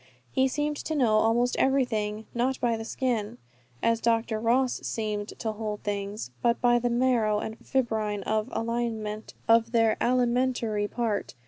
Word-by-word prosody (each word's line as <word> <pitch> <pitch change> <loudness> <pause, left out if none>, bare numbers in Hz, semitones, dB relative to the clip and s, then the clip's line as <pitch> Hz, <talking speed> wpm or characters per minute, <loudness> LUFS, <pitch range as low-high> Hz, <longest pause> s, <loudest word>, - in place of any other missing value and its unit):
He 265 - +3
seemed 295 +2 -1
to 315 - -3
know 235 -7 +3
almost 235 +3 +2
everything, 220 -5 +1
not 250 +2 0
by 235 -2 +1
the 225 - -5
skin, 225 - -2 0.5
as 230 0 +2
Dr. 225 -1 +1
Ross 245 +3 +2
seemed 210 -2 -3
to 225 - -2
hold 210 -1 -5
things, 200 - -4
but 235 0 +2
by 240 0 +4
the 245 0 0
marrow 235 -3 +2
and 220 +1 -4
fibrine 220 -6 -1
of 225 0 -1
their 225 -2 +3
alimentary 245 -3 +1
part. 220 - -2
230 Hz, 140 wpm, -27 LUFS, 215-245 Hz, 0.5 s, by